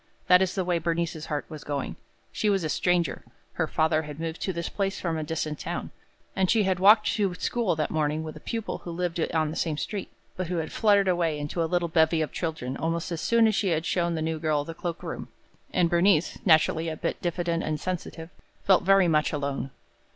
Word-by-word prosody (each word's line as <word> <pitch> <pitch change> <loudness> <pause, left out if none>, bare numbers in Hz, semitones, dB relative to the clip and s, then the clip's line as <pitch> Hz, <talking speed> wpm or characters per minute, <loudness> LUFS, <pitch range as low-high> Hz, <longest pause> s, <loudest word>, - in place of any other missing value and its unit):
That 180 0 +6
is 190 -1 0
the 190 -2 -1
way 175 -1 +1
Bernice's 165 -1 -2
heart 150 -2 -2
was 155 -2 -9
going. 140 -2 -3 0.4
She 215 - 0
was 195 -3 +1
a 155 - -1
stranger. 175 +1 +1 0.3
Her 160 - -1
father 155 0 +2
had 150 -1 -8
moved 165 0 -4
to 190 - -1
this 170 -1 -3
place 195 -1 -2
from 170 -3 -2
a 160 - -2
distant 155 -1 -3
town, - - -4 0.4
and 190 -1 +1
she 220 -2 +4
had 190 -2 0
walked 210 +3 +7
to 195 -4 0
school 220 -1 0
that 155 -1 -1
morning 155 0 0
with 155 -1 -7
a - - -9
pupil 225 +6 -4
who - - -9
lived 175 0 -2
on 155 -2 +1
the - - -6
same 160 -3 -1
street, 200 +4 -4 0.2
but 185 -1 -3
who 180 - -2
had 160 -1 -3
fluttered 205 -3 +3
away 170 -4 +1
into 150 +4 -3
a 165 - 0
little 175 0 +1
bevy 160 -1 +3
of 150 - -5
children 155 -6 -3
almost 165 +2 -2
as 170 -1 -3
soon 235 -1 +4
as 215 - +2
she 200 0 0
had 160 -1 0
shown 170 -2 0
the 160 - -2
new 160 0 -2
girl 150 -2 0
the 165 - -6
cloak 170 +1 -5
room; - - -5 0.4
and 175 -2 +3
Bernice, 170 -1 +2
naturally 160 0 +4
a 155 - -5
bit - - -3
diffident 170 -1 -1
and 155 -1 -2
sensitive, 175 -1 -5 0.3
felt 190 -2 +5
very 195 -1 +5
much 155 -2 +2
alone. 140 -2 -2
170 Hz, 225 wpm, -27 LUFS, 155-180 Hz, 0.4 s, walked